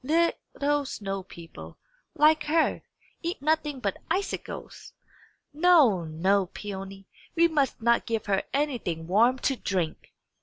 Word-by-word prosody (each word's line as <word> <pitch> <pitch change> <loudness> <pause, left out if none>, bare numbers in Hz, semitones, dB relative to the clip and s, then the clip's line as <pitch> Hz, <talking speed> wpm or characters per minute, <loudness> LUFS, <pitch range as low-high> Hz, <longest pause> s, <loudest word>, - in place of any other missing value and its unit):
Little 290 -1 0
snow 195 -6 -4
people, 170 -2 -12 0.4
like 305 0 +4
her, 320 +2 +1 0.4
eat 340 +1 -3
nothing 300 -1 0
but 200 -5 -3
icicles. 380 +4 -4 0.6
No, 295 - +5
no, 185 +5 +1
Peony; 195 0 -8 0.3
we 335 0 +5
must 285 -7 0
not 235 0 +3
give 225 -2 -2
her 195 -2 +1
anything 245 - -2
warm 225 +9 +3
to 270 - +2
drink!" 180 -9 -3
245 Hz, 120 wpm, -27 LUFS, 195-305 Hz, 0.6 s, No